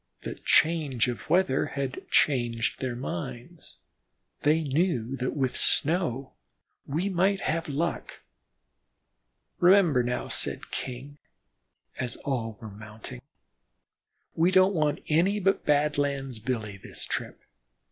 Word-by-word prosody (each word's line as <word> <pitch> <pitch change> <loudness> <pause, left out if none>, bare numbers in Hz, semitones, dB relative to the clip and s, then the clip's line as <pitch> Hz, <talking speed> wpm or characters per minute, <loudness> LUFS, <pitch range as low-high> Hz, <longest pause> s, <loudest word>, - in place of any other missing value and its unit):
The - - -4
change 155 -7 +3
of 120 - -6
weather 175 -7 +3
had 135 -1 -5
changed 120 -5 +2
their 130 -2 -2
minds; 120 - -6 0.6
they 155 +2 +3
knew 135 -4 0
that 125 0 -2
with 130 -3 0
snow 150 -5 +1 0.5
we 160 +8 -1
might 190 +1 +2
have 165 0 -1
luck. 165 +5 -3 1.4
"Remember 175 -7 +5
now," 125 0 -2
said - - -1
King, 135 +3 -5 0.8
as 125 - -3
all 115 -6 -2
were 110 -2 -9
mounting, 105 - -9 1.1
"we 165 +2 +3
don't 185 +1 +5
want 150 -4 0
any 180 +7 +3
but 195 0 +1
Badlands 145 -4 +1
Billy 110 -3 -3
this - - -7
trip. - - -4
140 Hz, 115 wpm, -27 LUFS, 120-165 Hz, 1.4 s, Remember